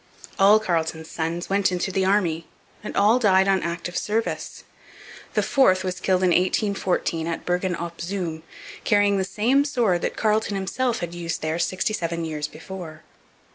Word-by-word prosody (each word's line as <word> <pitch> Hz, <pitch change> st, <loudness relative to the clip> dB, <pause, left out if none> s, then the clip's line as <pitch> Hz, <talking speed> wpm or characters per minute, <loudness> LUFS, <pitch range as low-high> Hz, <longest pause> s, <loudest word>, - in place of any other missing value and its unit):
All 205 Hz, +2 st, +7 dB
Carleton's 160 Hz, -5 st, -2 dB
sons 165 Hz, +2 st, -3 dB
went 195 Hz, -1 st, +2 dB
into 180 Hz, +2 st, -1 dB
the 190 Hz, 0 st, +1 dB
Army 175 Hz, -5 st, +1 dB, 0.4 s
and -, -, -5 dB
all 215 Hz, +5 st, +5 dB
died 190 Hz, -4 st, +4 dB
on 195 Hz, -1 st, +3 dB
active 170 Hz, +1 st, -4 dB
service. 215 Hz, +5 st, -2 dB, 0.7 s
The -, -, +2 dB
fourth 185 Hz, -9 st, +3 dB
was 185 Hz, 0 st, -3 dB
killed 185 Hz, 0 st, +1 dB
in 185 Hz, -, +4 dB
1814 185 Hz, -3 st, 0 dB
at 165 Hz, -, -4 dB
Bergen 180 Hz, 0 st, 0 dB
op 170 Hz, 0 st, -6 dB
Zoom 170 Hz, -3 st, -3 dB, 0.4 s
carrying 205 Hz, -2 st, +3 dB
the -, -, +1 dB
same 230 Hz, +9 st, +2 dB
sword 230 Hz, -, +1 dB
that -, -, -3 dB
Carleton 215 Hz, -1 st, +1 dB
himself 235 Hz, +6 st, -1 dB
had 170 Hz, -1 st, -4 dB
used 170 Hz, -2 st, -4 dB
there 160 Hz, +2 st, -1 dB
sixty 185 Hz, +5 st, 0 dB
seven 170 Hz, -4 st, -2 dB
years 150 Hz, -2 st, -3 dB
before. 160 Hz, 0 st, -9 dB
185 Hz, 165 wpm, -24 LUFS, 170-200 Hz, 0.7 s, All